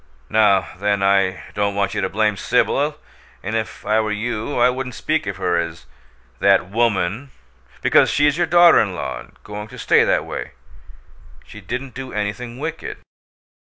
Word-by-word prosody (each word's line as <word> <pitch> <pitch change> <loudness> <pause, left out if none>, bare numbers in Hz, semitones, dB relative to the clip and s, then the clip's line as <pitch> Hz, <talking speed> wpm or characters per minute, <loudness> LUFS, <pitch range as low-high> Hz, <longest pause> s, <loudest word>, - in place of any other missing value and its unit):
Now, 105 -3 +3
then, 100 0 0
I 95 -1 +2
don't 100 -1 -1
want 100 -1 0
you - - -1
to 95 - -1
blame 105 0 +1
Sibyl, - - +1 0.5
and 110 +4 -3
if 110 -1 -4
I 110 +1 +2
were 110 -1 -1
you 110 +4 -3
I 120 - +6
wouldn't 125 -1 -3
speak 155 -4 -1
of 100 -2 -4
her 90 -2 0
as 85 0 -5 0.5
'that 95 -1 +3
woman,' 115 +2 0 0.5
because - - +5
she's 145 0 +3
your 175 +1 +1
daughter 175 0 +7
in 100 -4 0
law 65 -7 -4
and - - -15
going 105 0 -7
to - - -12
stay - - +4
that - - +1
way. - - -6 0.9
She 105 - -12
didn't 125 +6 -5
do 130 +1 -7
anything 105 +4 -4
wicked. 160 +3 -5
105 Hz, 170 wpm, -20 LUFS, 100-125 Hz, 0.9 s, daughter